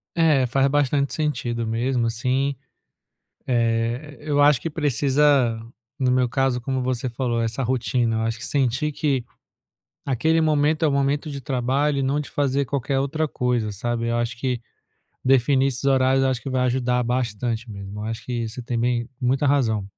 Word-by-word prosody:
É, 155 -6 +4
faz 135 +2 +2
bastante 140 0 +1
sentido 120 -7 -2
mesmo, 120 +2 0
assim 130 +5 0 1.0
eh, 120 +4 0
eu 150 -1 0
acho 145 -3 +5
que 165 - -3
precisa, 140 -4 +2 0.4
no 130 -2 +2
meu 125 -1 +2
caso, 130 0 0
como 130 +1 -2
você 130 0 -1
falou, 120 -1 -1
essa 115 +3 -2
rotina. 120 -2 0
Eu - - 0
acho 115 0 -1
que 115 - -6
sentir 140 +2 0
que 140 -4 0 0.8
aquele 155 +5 +2
momento 155 0 +2
é - - +4
o - - +1
momento 140 +2 0
de 140 -1 -6
trabalho 135 +3 0
e - - +1
não 135 +2 +1
de 150 - -9
fazer 140 -1 0
qualquer 135 0 -1
outra 155 +3 -1
coisa, 125 -5 -1
sabe. 115 +3 -2
Eu 115 - 0
acho 120 +1 -2
que, 125 -2 -1 0.6
definir 135 +1 +3
esses 125 -2 -3
horários, 135 -1 +3
eu 135 - +3
acho 125 - -2
que - - -6
vai 130 -1 +1
ajudar 125 0 +1
bastante 115 -1 -2
mesmo. 100 0 -8
Eu 105 - -5
acho 115 +1 -5
que 120 -2 -3
você 125 +3 -7
tem 120 0 -3
bem 120 0 0
muita 130 +3 +1
razão. 120 -8 +2
130 Hz, 180 wpm, -23 LUFS, 120-140 Hz, 1.0 s, acho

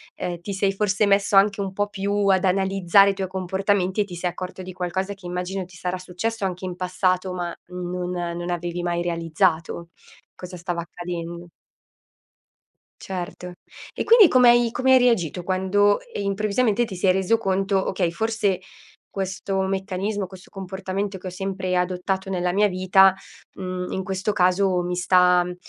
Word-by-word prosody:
ehm, 175 -1 -4
ti 200 +3 -5
sei 195 0 +1
forse 205 +1 +1
messo 200 0 +3
anche 200 +1 +4
un 195 -1 -3
po' 205 +1 -1
più 200 0 -1
ad 190 -1 +3
analizzare 195 +1 +4
i - - -4
tuoi 190 -1 -4
comportamenti 190 +1 0
e - - +3
ti 185 -3 -9
sei 175 +1 -1
accorto 185 +1 -7
di 185 0 -8
qualcosa 190 +2 -3
che 195 -2 -16
immagino, 180 +2 -3
ti 175 -1 -14
sarà 180 +1 -3
successo 195 +5 -4
anche 185 -1 -3
in 180 -1 -4
passato 185 0 0
ma 175 -1 -4
non 180 0 -4
non 175 0 -4
avevi 175 0 -3
mai 175 0 -1
realizzato 170 0 -1 0.5
cosa 180 0 -9
stava 175 0 -3
accadendo. 170 0 -7 1.6
Certo. 180 -1 -6 0.4
E - - -2
quindi, 450 -5 +8
come 250 -3 +6
hai 240 -1 +3
come 255 +3 +1
hai 260 - +7
reagito 190 - +1
quando, 190 +3 +2 0.2
ehm, 205 - -3
improvvisamente 210 +3 +1
ti 200 -5 -8
sei 185 +1 +3
reso 190 +5 +1
conto: 195 -1 0
"Okay, 180 -3 0
forse 210 -1 0 0.5
questo 190 0 -3
meccanismo, 195 +1 -2
questo 185 0 -14
comportamento 190 +1 -4
che 185 - -14
ho - - -2
sempre 190 0 -3
adottato 185 +2 -1
nella 180 -1 -1
mia 205 +2 +4
vita, 185 0 +4 0.4
mhmm, 185 -1 -5
in 190 - -2
questo 190 +2 -2
caso 185 0 +2
mi 180 0 -2
sta 180 0 +4
uhm, 180 0 -6
190 Hz, 170 wpm, -23 LUFS, 180-200 Hz, 1.6 s, quindi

